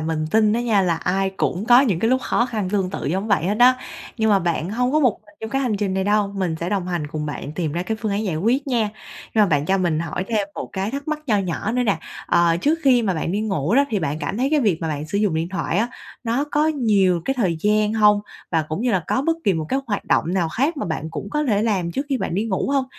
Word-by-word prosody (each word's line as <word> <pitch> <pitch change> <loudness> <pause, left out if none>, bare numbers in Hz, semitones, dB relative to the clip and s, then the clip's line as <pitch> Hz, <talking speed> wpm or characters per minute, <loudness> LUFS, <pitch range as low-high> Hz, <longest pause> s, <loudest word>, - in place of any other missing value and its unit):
mình 155 0 -2
tin 215 -1 +4
á 235 - +1
nha 220 -5 +2
là 175 -3 +1
ai 190 +3 0
cũng 185 +1 -1
có 240 +2 +7
những 210 -11 +1
cái 225 +5 +1
lúc 260 - +3
khó 240 - +1
khăn 215 -6 -3
tương 190 -3 0
tự - - -5
giống 190 +7 -1
vậy 200 -6 +2
hết 205 +4 0
á. 250 +1 +7 0.4
Nhưng 220 -1 +2
mà 200 - +5
bạn 170 -1 -1
hông 250 +4 0
có 310 - +3
một 250 -8 +2
mình 205 - -20
trong 220 - -5
cái 270 +2 0
hành 230 -5 0
trình 200 -2 -1
này 190 0 0
đâu, 205 -1 +1
mình 180 -4 -1
sẽ 170 - -2
đồng 190 -3 -1
hành, 175 -4 -2
cùng 150 0 -4
bạn 145 0 -5
tìm 160 -2 -2
ra 170 +2 -2
cái 220 +4 -3
phương 215 -3 -1
án 210 +2 -1
giải 170 -6 -1
quyết 245 - +1
nha. 235 -5 +1 0.5
Rồi, 215 -2 +5
bạn 150 -4 +1
cho 195 +1 +2
mình 170 -4 +1
hỏi 175 +2 -3
thêm 210 -3 0
một - - -5
cái 195 +2 -2
thắc 280 +3 -5
mắc 310 -1 -1
nho 215 -5 +2
nhỏ 195 +3 -2
nữa 250 +1 +1
nè, 200 -8 +1 0.3
ờ, 170 -1 +3
trước 300 - +1
khi 255 -3 +4
mà 195 -4 0
bạn 165 +1 -2
đi 205 - 0
ngủ 195 - 0
đó, 280 - +5
thì 215 - +1
bạn 155 -2 -2
cảm 200 - -3
thấy 265 +3 +1
cái 305 -2 +3
việc 200 -9 +2
mà 165 - -2
bạn 150 0 -3
sử 200 +5 -2
dụng 205 -6 +1
điện 160 +2 -1
thoại 185 -1 -2
á, 230 +3 +1 0.4
nó 235 +5 0
có 300 +1 +2
nhiều 205 - +2
cái 270 - 0
thời 190 -10 0
gian 210 0 +2
hông? 210 -2 +4 0.3
Và 160 -2 +2
cũng 155 +7 -3
như 250 - +1
là 185 - +1
có 265 - 0
bất 325 +2 +1
kỳ 200 - +4
một 160 - -2
cái 265 - +1
hoạt 205 -3 -2
động - - +2
nào 175 -4 +1
khác 275 - 0
mà 280 - -3
bạn 160 -1 -4
cũng 200 - -6
có 300 0 0
thể 215 -6 +1
làm 190 -6 0
trước 275 +2 -3
khi 275 - +1
bạn - - -3
đi 205 +4 0
ngủ 220 +3 -1
hông? 275 -2 +2
205 Hz, 295 wpm, -22 LUFS, 175-235 Hz, 0.5 s, có